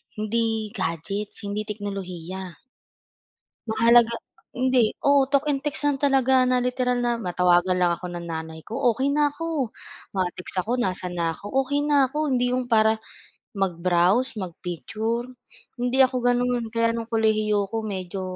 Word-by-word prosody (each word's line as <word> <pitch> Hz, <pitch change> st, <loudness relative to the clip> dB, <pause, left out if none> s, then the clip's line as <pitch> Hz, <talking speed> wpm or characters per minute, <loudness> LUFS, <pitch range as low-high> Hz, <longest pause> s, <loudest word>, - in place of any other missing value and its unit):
hindi 220 Hz, 0 st, -1 dB
gadgets, 195 Hz, +4 st, -4 dB
hindi 210 Hz, +1 st, -3 dB
teknolohiya. 190 Hz, -3 st, -6 dB, 1.1 s
Mahalaga 235 Hz, +1 st, +4 dB, 0.4 s
hindi, 255 Hz, -3 st, +2 dB
oo, 280 Hz, -1 st, +5 dB
talk 285 Hz, +1 st, +2 dB
and 275 Hz, -, 0 dB
text 295 Hz, 0 st, -3 dB
lang 285 Hz, -2 st, +2 dB
talaga 265 Hz, -2 st, +3 dB
na 250 Hz, -1 st, +2 dB
literal 250 Hz, 0 st, 0 dB
na 240 Hz, -1 st, 0 dB
matawagan 180 Hz, -1 st, +2 dB
lang 180 Hz, -1 st, +3 dB
ako 175 Hz, +1 st, -5 dB
ng 175 Hz, -1 st, -6 dB
nanay 160 Hz, -1 st, -6 dB
ko -, -, -12 dB, 0.2 s
okey 265 Hz, +4 st, 0 dB
na 295 Hz, 0 st, +3 dB
ako, 295 Hz, -4 st, -3 dB, 0.5 s
ma-text 185 Hz, 0 st, -3 dB
ako 245 Hz, +3 st, -1 dB
nasaan 185 Hz, -4 st, -2 dB
na 165 Hz, -1 st, 0 dB
ako -, -, -18 dB, 0.2 s
okey 285 Hz, +2 st, 0 dB
na 285 Hz, -3 st, +4 dB
ako. 300 Hz, +2 st, -1 dB
Hindi 250 Hz, 0 st, +2 dB
'yong 255 Hz, -, 0 dB
para 220 Hz, 0 st, +4 dB, 0.6 s
mag-browse, 185 Hz, +5 st, +1 dB
mag-picture, 215 Hz, +7 st, -4 dB, 0.5 s
hindi 245 Hz, +2 st, -1 dB
ako 260 Hz, -1 st, +5 dB
gano'n 245 Hz, -2 st, +1 dB
kaya 230 Hz, 0 st, +1 dB
no'ng 230 Hz, -, -3 dB
kolehiyo 215 Hz, -2 st, +2 dB
ako, 225 Hz, -, -4 dB
medyo 190 Hz, -2 st, -4 dB
225 Hz, 145 wpm, -24 LUFS, 185-255 Hz, 1.1 s, oo